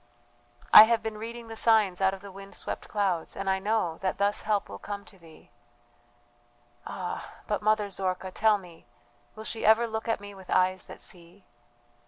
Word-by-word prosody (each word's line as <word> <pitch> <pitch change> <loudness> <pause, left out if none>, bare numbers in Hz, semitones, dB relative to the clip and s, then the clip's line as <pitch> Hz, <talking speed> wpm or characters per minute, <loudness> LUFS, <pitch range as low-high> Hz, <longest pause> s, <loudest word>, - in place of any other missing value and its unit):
"I 215 - +13
have 230 0 +1
been 220 -1 -4
reading 230 +1 -7
the 225 - -8
signs 215 -5 +3
out 190 0 +4
of 190 - -14
the 200 -1 -10
wind 195 +1 -12
swept - - -5
clouds, 190 -6 -1
and 195 - -5
I 190 0 +2
know 195 -5 -1
that 190 -1 -2
thus 200 +1 +1
help 210 -2 0
will 100 0 -9
come 200 -1 -6
to 195 - -17
thee." 160 -6 -17 1.4
"Ah, 180 -2 -6
but, 210 - -2
Mother 210 -1 +1
Zorka, 185 0 -3
tell 215 +2 +3
me, 175 -8 -15 0.5
will 220 - -8
she 220 0 -4
ever 220 +2 +5
look 220 0 -4
at 225 - 0
me 205 0 -10
with 190 -2 -14
eyes 185 0 +2
that - - -11
see?" 175 +2 -11
200 Hz, 190 wpm, -28 LUFS, 185-220 Hz, 1.4 s, I